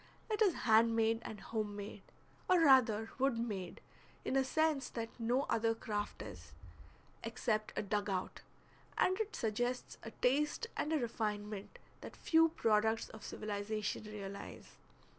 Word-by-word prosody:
It 430 Hz, -, 0 dB
is 395 Hz, -6 st, +5 dB
hand 225 Hz, 0 st, +5 dB
made 225 Hz, 0 st, +3 dB
and 215 Hz, -2 st, -7 dB
home 215 Hz, -2 st, -3 dB
made, 205 Hz, 0 st, -7 dB, 0.5 s
or 365 Hz, -1 st, +6 dB
rather 230 Hz, -7 st, +5 dB
wood 270 Hz, -2 st, +2 dB
made, 205 Hz, -6 st, -4 dB, 0.4 s
in -, -, 0 dB
a 270 Hz, -, +4 dB
sense 300 Hz, -1 st, +1 dB
that 230 Hz, -1 st, -4 dB
no 240 Hz, +4 st, +2 dB
other 225 Hz, -3 st, +1 dB
craft 210 Hz, -2 st, -3 dB
is, 85 Hz, -5 st, -10 dB, 0.7 s
except 220 Hz, -2 st, -1 dB
a -, -, +1 dB
dug 205 Hz, 0 st, -1 dB
out, 185 Hz, -1 st, -3 dB, 0.6 s
and 375 Hz, +2 st, +3 dB
it 435 Hz, -1 st, -2 dB
suggests 245 Hz, +3 st, -2 dB
a 225 Hz, -, -7 dB
taste 290 Hz, -, +1 dB
and 300 Hz, -, -1 dB
a 320 Hz, -, +3 dB
refinement 210 Hz, -4 st, -3 dB, 0.2 s
that -, -, -9 dB
few 325 Hz, 0 st, +4 dB
products 220 Hz, -5 st, +2 dB
of 220 Hz, -, -11 dB
civilization 210 Hz, 0 st, -3 dB
realize. 200 Hz, -2 st, -8 dB
225 Hz, 145 wpm, -36 LUFS, 210-260 Hz, 0.7 s, or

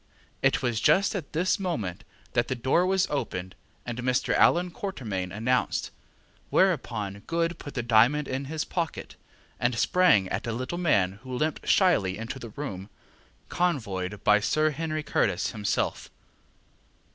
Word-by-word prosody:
It -, -, +2 dB
was 120 Hz, -3 st, 0 dB
just 200 Hz, +3 st, +4 dB
at 180 Hz, -8 st, -5 dB
this 180 Hz, +6 st, +1 dB
moment 105 Hz, -, -3 dB, 0.3 s
that 120 Hz, -, +2 dB
the 130 Hz, -, -1 dB
door 135 Hz, +9 st, +2 dB
was 190 Hz, 0 st, +2 dB
opened, 95 Hz, -10 st, -3 dB, 0.3 s
and 120 Hz, 0 st, -5 dB
Mr. 125 Hz, 0 st, +1 dB
Allan 175 Hz, +1 st, +4 dB
Quatermain 110 Hz, -, -4 dB
announced, 120 Hz, +5 st, 0 dB, 0.6 s
whereupon 100 Hz, -3 st, +1 dB
Good 165 Hz, 0 st, -1 dB
put 145 Hz, -, -9 dB
the 125 Hz, -, -1 dB
diamond 120 Hz, +6 st, +4 dB
into 135 Hz, +1 st, -4 dB
his 160 Hz, -1 st, -2 dB
pocket, 170 Hz, -3 st, -4 dB, 0.4 s
and 120 Hz, -1 st, 0 dB
sprang 145 Hz, -, +4 dB
at -, -, -3 dB
a 115 Hz, -, -1 dB
little 130 Hz, +9 st, -4 dB
man 100 Hz, -, +2 dB
who 130 Hz, -1 st, -6 dB
limped 155 Hz, +3 st, -2 dB
shyly 105 Hz, -, +3 dB
into 120 Hz, +4 st, -6 dB
the 120 Hz, -, -8 dB
room, 105 Hz, -6 st, -6 dB, 0.6 s
convoyed 105 Hz, -, -2 dB
by 105 Hz, 0 st, +5 dB
Sir 155 Hz, +8 st, +1 dB
Henry 155 Hz, +1 st, -3 dB
Curtis -, -, 0 dB
himself. 105 Hz, -3 st, -2 dB
130 Hz, 145 wpm, -27 LUFS, 105-165 Hz, 0.6 s, by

